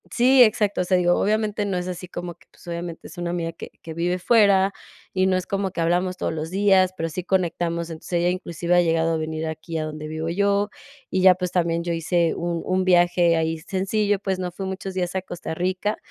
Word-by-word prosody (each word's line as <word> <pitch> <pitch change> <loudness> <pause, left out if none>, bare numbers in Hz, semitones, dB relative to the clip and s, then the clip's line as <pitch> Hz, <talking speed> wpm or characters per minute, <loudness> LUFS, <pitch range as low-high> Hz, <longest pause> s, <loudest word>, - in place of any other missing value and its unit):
Sí, 255 +2 +5
exacto, 210 -3 +2
o - - +1
sea, 185 +1 +2
digo, 175 -1 +3
obviamente, 215 0 0
no 195 -2 -1
es 180 0 -3
así 180 0 -6
como 175 -1 -6
que, - - -26
pues, - - -20
obviamente, 170 -1 -6
es - - -13
una 175 0 -3
amiga 170 -1 -2
que 165 - -10
que 165 - -7
vive 175 +2 0
fuera 200 -1 +4 0.4
y 185 0 +2
no 185 -1 +2
es 185 - -3
como 195 -1 -1
que - - -6
hablamos 180 +2 +1
todos - - -2
los 160 0 -4
días, 190 -1 +3
pero 165 - -1
sí 170 +3 -5
conectamos, 170 -2 -1
entonces, 160 +2 -9
ella 175 0 +2
inclusive 175 -1 -1
ha 175 - +6
llegado 165 -1 +1
a - - 0
venir 160 0 -3
aquí 160 +1 -5
a 155 - -2
donde 155 0 -6
vivo 160 +1 -4
yo, 200 +3 +1 0.4
y 190 - +1
ya, 185 -1 +7
pues, 180 -1 -3
también 170 -1 0
yo 170 0 -2
hice 165 0 +1
un 170 -1 -2
un 185 0 +1
viaje 175 -1 +4
ahí 160 0 -1
sencillo, 200 +4 0
pues, 190 -1 -2
no 180 -1 -3
fui 190 +3 -6
muchos 190 0 -5
días 180 0 -2
a 190 - 0
Costa 175 -3 -6
Rica, 185 +4 -1
180 Hz, 235 wpm, -23 LUFS, 170-190 Hz, 0.4 s, ya